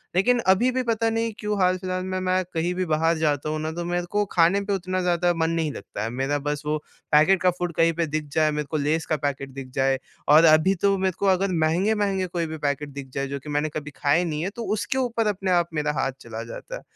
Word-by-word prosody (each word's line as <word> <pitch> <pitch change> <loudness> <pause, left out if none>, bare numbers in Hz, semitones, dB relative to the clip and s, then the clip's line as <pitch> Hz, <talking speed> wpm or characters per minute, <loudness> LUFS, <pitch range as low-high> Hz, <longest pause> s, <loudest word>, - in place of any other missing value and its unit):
लेकिन 240 +7 +3
अभी 190 +7 +4
भी 255 0 -1
पता 230 -1 +1
नहीं 225 0 -1
क्यों 210 -1 -2
हाल-फ़िलहाल 185 0 0
में 185 0 -2
मैं 185 0 +1
कहीं 170 +2 0
भी 185 0 -1
बाहर 165 +1 +1
जाता 150 -2 0
हूँ 155 0 -2
ना, 155 0 -2
तो 170 +1 -5
मेरे 175 0 -1
को 205 0 +1
खाने 175 +3 +4
पे 200 - -1
उतना 185 -1 -2
ज़्यादा 175 0 +2
मन 160 -1 0
नहीं 160 -3 0
लगता - - -6
है। 115 - -2
मेरा 140 +2 +1
बस 145 +1 -3
वो 150 +1 0 0.3
पैकेट 160 +5 +5
का 185 - +4
फूड 175 -1 -2
कहीं 165 +1 +3
पे 170 +1 0
दिख 155 0 -2
जाए 155 -1 +3
मेरे 150 0 -2
को 155 - 0
लेज़ 155 +3 0
का 155 - +1
पैकेट 140 -1 -3
दिख 135 -1 -8
जाए। 135 0 +2 0.3
और 155 +3 +8
अभी 155 +4 +5
तो 200 -1 +3
मेरे 190 -1 0
को - - 0
अगर 190 +1 +2
महँगे-महँगे 195 +2 +1
कोई 170 -1 -2
भी 160 0 -5
पैकेट 145 +1 -2
दिख 140 -1 -8
जाए 135 0 -2
जो 140 +1 -4
कि 150 +3 -10
मैंने 145 +1 0
कभी 150 0 -6
खाए 150 +4 +2
नहीं 155 -3 -2
है 190 - -1
तो 235 - -4
उसके 215 +5 -2
ऊपर 235 -4 0
अपने 195 -2 -1
आप 175 -1 +2
मेरा 150 -1 0
हाथ 135 - 0
चला 115 -1 -6
जाता 115 - -8
है। - - -8
170 Hz, 255 wpm, -24 LUFS, 150-190 Hz, 0.3 s, और